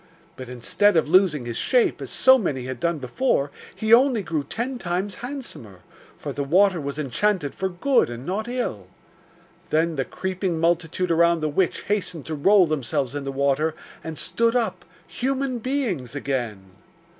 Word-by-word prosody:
But 130 -1 -9
instead 165 - +2
of 160 - +2
losing 170 -7 +4
his 120 -1 -4
shape, 250 -3 +2
as - - -6
so 260 0 +5
many 140 - -2
had 130 -1 -5
done 170 +2 0
before, 140 - 0 0.2
he 220 +1 +2
only 245 -3 +5
grew 160 -5 -2
ten 245 - -4
times 185 +2 -2
handsomer; 240 - -8 0.4
for - - -6
the 145 - -2
water 180 +4 +3
was 140 0 -4
enchanted 150 - 0
for 190 0 -2
good 235 - +2
and 120 +2 -7
not 205 +6 -2
ill. 240 - -3 0.8
Then 160 0 +1
the 135 - +1
creeping 185 -2 -3
multitude 170 +1 0
around 170 0 +3
the 155 - 0
witch 175 +4 0
hastened 185 -6 -2
to 160 - -4
roll 190 +6 +5
themselves 135 -4 -1
in 145 -1 -4
the 135 - -2
water, 140 +3 +1 0.3
and 160 -1 -6
stood 230 +8 +1
up, 240 -2 -1 0.2
human 265 -1 -2
beings 215 - -2
again. 120 -9 -3
170 Hz, 165 wpm, -24 LUFS, 140-210 Hz, 0.8 s, so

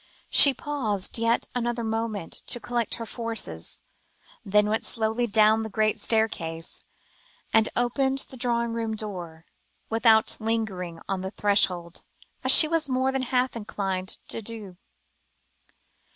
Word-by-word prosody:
She 280 - +9
paused 225 -9 -2
yet 230 +1 +1
another 240 -1 -2
moment 220 -5 -3
to 240 - 0
collect 240 -2 -2
her 230 - -6
forces, 225 - -5 0.6
then 210 +1 +2
went 220 +1 -1
slowly 225 +1 -1
down 220 0 +4
the 220 - -5
great 215 +1 0
staircase, 165 -8 -1 0.7
and 220 0 +4
opened 265 +3 0
the - - -9
drawing 235 -2 -1
room 225 -1 -3
door, 175 -7 -7 0.5
without 225 0 +4
lingering 195 -7 -3
on 195 -1 -2
the 190 - -4
threshold, 185 -4 0 0.4
as - - +5
she 310 - +9
was 315 -2 0
more 260 +1 +1
than 265 0 -2
half 255 0 0
inclined 195 -4 -4
to - - -4
do. 210 -4 -9
220 Hz, 135 wpm, -25 LUFS, 200-235 Hz, 0.7 s, She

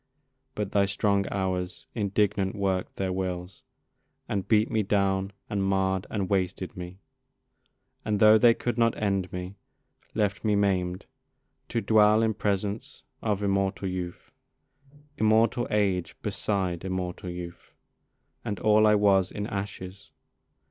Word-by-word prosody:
But 105 -2 -3
thy 100 -1 +3
strong 100 0 +1
Hours 90 -2 -3
indignant 100 -2 0
work'd 95 -2 -1
their 95 -1 -2
wills, 90 -1 -4 0.7
And 100 -3 -2
beat 110 0 +3
me 110 - +2
down 95 -1 +1 0.2
and 100 -3 -1
marr'd 95 0 0
and 100 -3 -2
wasted 95 -1 -1
me, 90 0 -8 1.1
And 105 -1 -1
tho' 110 +1 +7
they 115 +1 +6
could 120 -1 -2
not 115 -1 +3
end 100 -3 -1
me, 90 +2 -6 0.6
left 105 -1 0
me 105 -2 +2
maim'd 95 -3 0 0.6
To 115 - -1
dwell 110 0 +5
in 110 -1 +2
presence 100 +1 -3 0.2
of 105 -2 -1
immortal 100 0 0
youth, 90 -1 -5 0.9
Immortal 110 +2 +3
age 95 -4 0
beside 95 -5 -2
immortal 95 -1 -4
youth, 85 -1 -8 0.7
And 100 - -3
all 110 0 +4
I 105 - +5
was, 100 -3 +3
in 105 - -4
ashes. 100 -1 -6
100 Hz, 130 wpm, -27 LUFS, 95-105 Hz, 1.1 s, tho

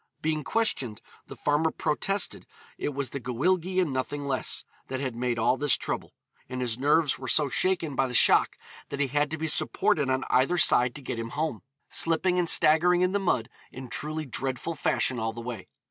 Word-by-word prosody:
Being 155 -1 -1
questioned, 135 - -1 0.3
the - - -9
farmer 150 +2 +1
protested 185 +6 -1 0.3
it - - -1
was 140 -3 -3
the 140 - -4
Gwyllgi 175 +10 0
and 170 -7 0
nothing 140 +2 -3
less, 135 -2 -2 0.2
that 130 - -4
had 130 -3 -3
made 120 0 -1
all 115 +3 +2
this 145 -1 +3
trouble, - - -5 0.3
and 130 0 -5
his 120 -2 -2
nerves 145 +1 +2
were 130 - -7
so 145 +1 +2
shaken 170 -1 0
by 135 - +1
the 125 - -5
shock - - +5 0.3
that 140 - -5
he 140 -2 +1
had 145 +2 +1
to 160 - -4
be 160 +1 -3
supported 145 -2 +2
on 130 0 0
either 135 +8 +2
side 125 -6 +4
to 145 - -8
get 120 - -4
him 115 0 -4
home, 155 -8 -2 0.3
slipping 180 +2 +1
and 170 -2 0
staggering 170 +3 +4
in 180 0 +2
the 200 - 0
mud 125 - 0 0.2
in 130 -1 -9
truly 155 +5 -4
dreadful 130 +4 -4
fashion 130 -4 0
all 110 0 -2
the 120 - -8
way. 115 -5 -7
145 Hz, 200 wpm, -27 LUFS, 125-160 Hz, 0.3 s, shock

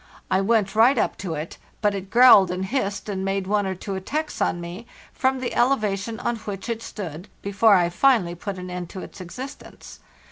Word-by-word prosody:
I 190 +1 +3
went 210 -1 +1
right 235 +5 +5
up - - +1
to 175 -4 -4
it, 155 +2 -6 0.2
but 210 -1 +2
it 195 -1 -6
growled 235 -6 +7
and 180 +1 -2
hissed, 200 -4 -2
and 190 -2 -3
made 195 0 -1
one 205 0 +1
or 190 - -2
two 195 +2 -6
attacks 295 +12 -3
on 175 - +1
me 175 +7 -8 0.3
from 265 0 +1
the 255 - -3
elevation 220 -3 0
on 240 - -1
which 205 0 -7
it 230 -1 -2
stood 180 -5 -7 0.2
before 200 +1 +4
I 175 -2 +3
finally 185 -2 +3
put 190 +3 -6
an 180 0 -7
end 180 -1 -5
to 190 - -7
its - - -10
existence. 255 +11 -9
200 Hz, 205 wpm, -24 LUFS, 185-230 Hz, 0.3 s, growled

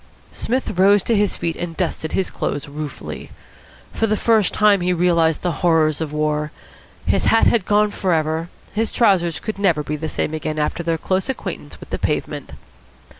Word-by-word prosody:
Psmith 250 -6 -2
rose 200 +1 +5
to 230 - +1
his 205 -1 +1
feet 165 -2 -2
and 170 -2 -5
dusted 165 -3 -2
his 190 - 0
clothes 145 0 -3
ruefully. 145 0 -7 0.6
For 225 - +1
the 215 0 +1
first 220 -4 +3
time 210 -3 +4
he 180 +1 +1
realised 170 -2 +2
the 180 - +1
horrors 160 -3 +3
of 155 -2 -3
war. 150 0 -1 0.5
His - - +1
hat 225 - +4
had 220 -6 +2
gone 210 0 +3
for 190 -2 -1
ever. 160 +1 0 0.2
His 220 +2 0
trousers 180 -8 +2
could 215 -3 -5
never 170 -7 +2
be 150 - -3
the 155 +1 -4
same 155 - -2
again 155 0 -3
after 150 +3 -1
their 165 -1 0
close 190 - -1
acquaintance 265 - -5
with - - -13
the - - -2
pavement. - - -3
175 Hz, 185 wpm, -20 LUFS, 155-205 Hz, 0.6 s, rose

